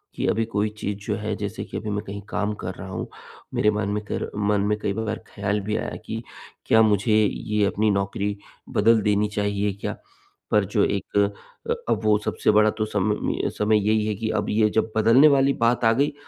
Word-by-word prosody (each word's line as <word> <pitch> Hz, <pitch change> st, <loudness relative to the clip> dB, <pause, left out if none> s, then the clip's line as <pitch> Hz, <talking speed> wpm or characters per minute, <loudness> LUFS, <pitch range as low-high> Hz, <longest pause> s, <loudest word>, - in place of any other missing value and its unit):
कि -, -, -2 dB
अभी 115 Hz, +1 st, +1 dB
कोई 105 Hz, -1 st, -1 dB
चीज़ 100 Hz, -1 st, -3 dB
जो 105 Hz, -, -1 dB
है 105 Hz, 0 st, -3 dB
जैसे 105 Hz, +1 st, -4 dB
कि -, -, -6 dB
अभी 110 Hz, -, -5 dB
मैं 105 Hz, 0 st, -2 dB
कहीं 100 Hz, +1 st, -6 dB
काम 105 Hz, +1 st, -1 dB
कर 90 Hz, +1 st, -3 dB
रहा 95 Hz, -, -8 dB
हूँ, 95 Hz, -, -4 dB, 0.5 s
मेरे 105 Hz, -, +3 dB
मन 105 Hz, -1 st, -2 dB
में 105 Hz, +1 st, -2 dB
कर -, -, -3 dB
मन 105 Hz, -1 st, +1 dB
में 105 Hz, +1 st, +1 dB
कई 100 Hz, -1 st, -1 dB
बार 110 Hz, +1 st, -3 dB
ख्याल 105 Hz, 0 st, -2 dB
भी 105 Hz, +2 st, -2 dB
आया -, -, -4 dB
कि -, -, -5 dB, 0.4 s
क्या 110 Hz, -, +5 dB
मुझे 105 Hz, 0 st, +3 dB
ये 105 Hz, +1 st, 0 dB
अपनी 105 Hz, +2 st, +1 dB
नौकरी 100 Hz, +1 st, -1 dB, 0.3 s
बदल 110 Hz, +1 st, +4 dB
देनी 105 Hz, 0 st, +2 dB
चाहिए 100 Hz, 0 st, 0 dB
क्या? 100 Hz, -, -5 dB, 0.5 s
पर 105 Hz, -2 st, +3 dB
जो 105 Hz, +2 st, +1 dB
एक 100 Hz, 0 st, -2 dB, 0.5 s
अ, -, -, +3 dB, 0.2 s
अब -, -, +2 dB
वो 105 Hz, -1 st, +4 dB
सबसे 105 Hz, -, 0 dB
बड़ा 105 Hz, 0 st, +5 dB
तो 110 Hz, -, 0 dB
समम 105 Hz, 0 st, -1 dB
समय 105 Hz, +1 st, +3 dB
यही 110 Hz, 0 st, +2 dB
है 105 Hz, -, 0 dB
कि 110 Hz, +2 st, -3 dB
अब -, -, -1 dB
ये 105 Hz, 0 st, +3 dB
जब 110 Hz, 0 st, +1 dB
बदलने 115 Hz, +7 st, +6 dB
वाली 140 Hz, -1 st, +4 dB
बात 115 Hz, 0 st, +1 dB
आ 115 Hz, -, +6 dB
गई 140 Hz, +5 st, +1 dB
105 Hz, 215 wpm, -24 LUFS, 100-110 Hz, 0.5 s, बदलने